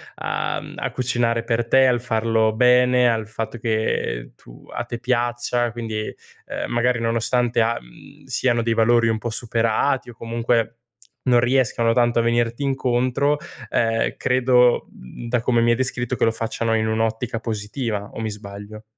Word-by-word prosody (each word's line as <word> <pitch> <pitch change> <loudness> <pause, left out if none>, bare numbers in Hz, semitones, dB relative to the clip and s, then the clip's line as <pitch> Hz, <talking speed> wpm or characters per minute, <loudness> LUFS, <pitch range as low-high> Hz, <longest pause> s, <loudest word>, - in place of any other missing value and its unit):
a - - -2
mhmm, - - -10
a - - -3
cucinare 120 -2 0
per 115 0 -1
te, 130 +2 +5
al 120 -2 +2
farlo 110 -2 +1
bene, 125 +1 +4
al 110 -2 0
fatto 115 +2 -5
che 110 - -1
tu - - -16
a - - -2
te 120 0 -6
piaccia, 120 -1 0
quindi, 110 -2 -4 0.4
uhm, - - -4
magari 120 0 +1
nonostante 115 +1 +1
a 115 +1 +1
mhmm, - - -17
siano 120 -3 0
dei 115 0 +1
valori 115 +1 +3
un 110 -1 0
po' 120 - -4
superati, 115 +3 0
o, - - -9
comunque, 115 0 0 0.6
non 120 -1 +5
riescano 120 -2 +2
tanto 120 0 +2
a - - +4
venirti 120 +2 0
incontro, 130 +1 +1 0.3
ehm, 115 0 +1
credo, 125 -1 +3
mhmm, 65 - -11
da 120 0 0
come 120 -1 +2
mi 120 - +3
hai - - +4
descritto, 125 -1 -2
che - - -1
lo 115 - +4
facciano 115 0 -2
in 110 0 +1
un'ottica 110 +1 -1
positiva, 105 -1 -4
o - - -6
mi 110 -1 -2
sbaglio? 105 +1 -9
115 Hz, 170 wpm, -22 LUFS, 115-120 Hz, 0.6 s, te